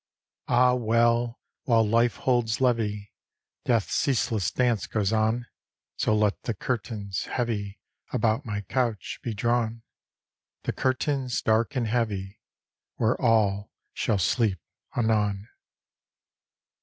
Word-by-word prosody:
Ah, 125 +1 +4
well! 120 0 +2 0.3
while 115 -3 +4
Life 115 +2 +3
holds 120 -3 +1
levee, 110 -5 0 0.5
Death's 115 -4 +1
ceaseless 115 - +1
dance 120 -5 +1
goes 105 -1 0
on. 110 +2 +1 0.5
So 110 - +1
let 105 -1 +1
the 115 - -3
curtains, 100 -4 -3
heavy 105 -5 -3 0.3
About 115 +1 +1
my 105 -5 -3
couch, 115 -1 -2
be 115 -3 -4
drawn 115 +1 0 0.8
The - - -2
curtains, 130 -1 0
dark 115 +6 +2
and 125 -3 0
heavy, 105 -4 -2 0.6
Where 115 +1 0
all 105 -4 +2 0.2
shall 105 - 0
sleep 100 +2 +1 0.4
anon. 105 -3 +1
115 Hz, 110 wpm, -26 LUFS, 105-120 Hz, 0.8 s, Ah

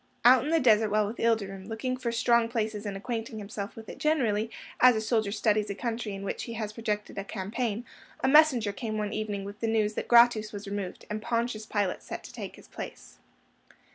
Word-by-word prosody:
Out 250 0 +8
in 295 - -2
the 330 0 +4
desert 220 -4 +4
while 210 0 +2
with 215 +4 -5
Ilderim, 200 -4 0
looking 240 +3 -2
for 250 -2 -3
strong 235 0 +3
places 215 -3 -2
and 195 -1 -3
acquainting 225 +1 -4
himself 205 0 -6
with 225 -1 -10
it - - -9
generally, 230 -9 +1 0.3
as 250 -1 +7
a - - +1
soldier 220 -2 0
studies 210 0 +1
a 200 - -3
country 230 -2 -3
in 195 - -7
which 200 - -3
he 235 - -6
has 215 -2 -4
projected 210 -3 -3
a - - -3
campaign, 215 +3 -3 0.4
a - - +2
messenger 265 -7 +5
came 215 +1 -4
one 210 0 -2
evening 210 -2 -3
with 205 +1 -8
the 230 - -1
news 220 -1 +1
that - - -4
Gratus 235 -3 +5
was 205 0 -7
removed, 200 -2 -5
and 215 0 -2
Pontius 230 -1 -1
Pilate 205 -3 -1
sent - - -7
to - - -11
take - - -7
his - - -16
place. - - -9
220 Hz, 215 wpm, -28 LUFS, 205-235 Hz, 0.4 s, Out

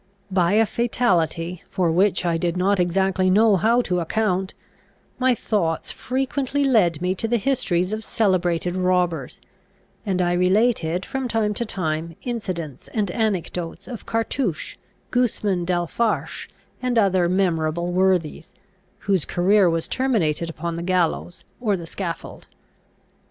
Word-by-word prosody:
By 180 -1 +2
a 225 +1 +5
fatality, 180 -7 0
for 180 -4 +1
which 185 +2 +2
I 170 -1 +1
did 170 +1 -1
not 195 +2 +2
exactly 185 +1 +2
know 210 +2 +5
how 230 +6 +3
to 180 -4 0
account, 190 +1 -1 0.6
my 255 -1 +3
thoughts 175 -8 -1
frequently 270 +2 -1
led 180 - +3
me 180 +1 +1
to 225 +4 -2
the 240 +1 +2
histories 195 -6 0
of 220 0 -3
celebrated 180 -5 0
robbers; 180 -6 0 0.6
and 190 -3 -1
I 175 -1 +2
related, 180 -1 +2
from 265 -1 -3
time 225 -3 0
to 235 +3 -2
time, 165 -3 -3
incidents 185 - -5
and 205 -4 0
anecdotes 180 -5 -2
of 240 -4 -8
Cartouche, 225 - -2 0.4
Gusman 210 -7 0
d'Alfarache, 180 +6 -1 0.3
and 250 -1 0
other 190 -5 +3
memorable 170 -2 0
worthies, 180 -4 0 0.5
whose 195 -6 +1
career 190 +1 +3
was 165 -1 -1
terminated 175 - 0
upon 165 +1 -4
the - - -4
gallows 175 -1 -1 0.2
or 210 -5 +1
the 170 - -7
scaffold. 170 0 -6
185 Hz, 135 wpm, -23 LUFS, 170-220 Hz, 0.6 s, a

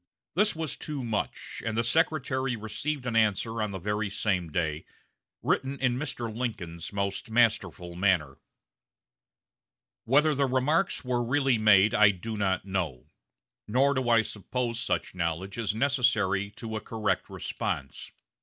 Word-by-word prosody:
This 210 -3 +2
was 160 -2 -4
too 145 -4 -5
much; 115 -3 -3
and 115 -1 -2
the 115 - +2
Secretary 130 -2 +1
received 125 +6 -4
an 120 -2 -2
answer 110 +1 +2
on 105 - 0
the 100 - -5
very 105 +2 -2
same 95 -5 -1
day, 80 -2 -1 0.6
written 135 +1 0
in 125 -2 +2
Mr. 120 -5 -4
Lincoln's 95 -9 -4
most 100 +4 -2
masterful 105 -7 +1
manner: 85 -7 +1 1.7
"Whether 150 +6 +4
the 140 -1 +1
remarks 140 +7 +1
were 125 -1 0
really 130 -1 +2
made 105 -1 +6
I 105 -1 +7
do 105 +4 -4
not 95 -3 0
know, 85 -10 -3 0.6
nor 135 +6 +3
do 130 -3 -1
I 115 -2 +5
suppose 115 +3 -3
such 125 - -1
knowledge 90 +4 -3
is 105 -2 -1
necessary 110 -7 +2
to 110 -1 -5
a 110 - -3
correct 105 -5 -1
response. - - -4
110 Hz, 145 wpm, -28 LUFS, 100-130 Hz, 1.7 s, I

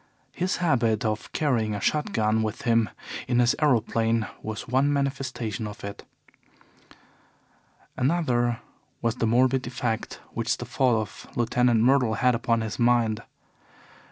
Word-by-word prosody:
His 185 +2 -1
habit 120 -11 +1
of 110 -1 -2
carrying 115 -8 0
a - - -3
shot 150 +8 0
gun 110 0 +1
with 110 -1 -3
him 115 -2 +3 0.4
in 120 - +1
his 120 +3 +4
aeroplane 115 -4 +2 0.2
was 110 -1 -5
one 135 +4 +2
manifestation 130 -6 -2
of 105 - -10
it. 100 0 -7 1.9
Another 125 -5 +1 0.4
was 115 +1 0
the 115 - +1
morbid 130 +2 +2
effect 120 -2 -3
which - - -1
the - - -6
fall 125 -4 +2
of 110 -2 -7
Lieutenant 120 -1 +2
Myrtle 125 -2 +3
had 125 +3 +3
upon 115 -1 +1
his 110 -5 -4
mind. 120 -2 +2
120 Hz, 135 wpm, -26 LUFS, 110-130 Hz, 1.9 s, his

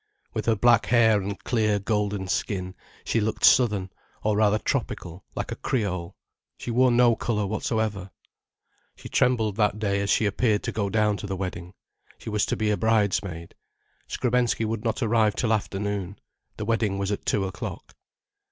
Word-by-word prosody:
With - - -3
her 115 - +4
black 120 +1 +4
hair 110 -3 +4
and 100 +2 -4
clear 110 -4 +1
golden 105 -1 -1
skin, 95 -1 -2 0.3
she 115 - 0
looked 110 +1 +1
southern, 105 -7 +4 0.3
or 105 -1 +1
rather 105 0 +3
tropical, 90 -4 -3
like - - -4
a - - -2
Creole. 90 -7 -2 0.4
She 120 - -5
wore 125 +2 +4
no 120 -1 +4
colour 105 -2 -1
whatsoever. 105 -2 -2 0.9
She - - -11
trembled 115 -5 +1
that 105 -1 +2
day 100 -2 0
as 100 - -2
she 110 - +3
appeared 105 0 +1
to - - -2
go 100 -2 -1
down 105 -1 +2
to 100 - -6
the 95 - -3
wedding. 90 -1 -5 0.4
She 110 - -7
was 105 -1 +1
to - - -1
be 110 -1 +1
a 105 - +1
bridesmaid. 100 -6 0 0.5
Skrebensky 120 -2 0
would 110 0 -3
not 115 +2 -1
arrive 110 -2 +2
till 115 -2 +1
afternoon. 100 -2 -3 0.4
The 105 - -4
wedding 110 -3 0
was 100 +1 -2
at 100 - -3
two 100 -2 0
o'clock. 95 -1 -7
105 Hz, 170 wpm, -25 LUFS, 100-115 Hz, 0.9 s, her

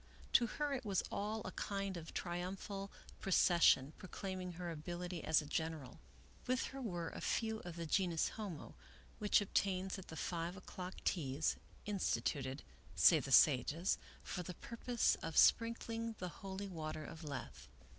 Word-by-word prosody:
To 240 - +6
her 295 +5 -1
it 265 -1 -2
was 200 -4 +1
all 215 +2 -2
a 185 - -3
kind 195 -1 -2
of 165 -2 -7
triumphal 190 +3 -4 0.3
procession, 170 -6 +5
proclaiming 185 -1 -5
her 175 0 -4
ability 175 +2 -5
as 155 -1 +4
a - - -9
general. 155 -3 -3 0.5
With 255 +1 +2
her 270 - -5
were 175 -8 -2
a - - -7
choice - - -6
few 220 -1 0
of 175 -4 -7
the 170 -1 -4
genus 170 -1 +2
homo, 195 -9 -6 0.5
which 210 -1 +4
obtains 190 -1 0
at 185 - -10
the 160 - -8
five 170 +3 -2
o'clock 185 0 -7
teas, 145 -3 +1 0.3
instituted, 145 -9 -1 0.3
say - - +7
the - - -5
sages, 150 +8 +5 0.2
for 180 - -3
the 180 0 -6
purpose 235 +3 +1
of 165 - -4
sprinkling 230 -1 +3
the 180 - -4
holy 195 +1 -4
water 155 -4 -4
of 165 0 -8
Lethe. 140 -4 -6
180 Hz, 155 wpm, -38 LUFS, 165-200 Hz, 0.5 s, say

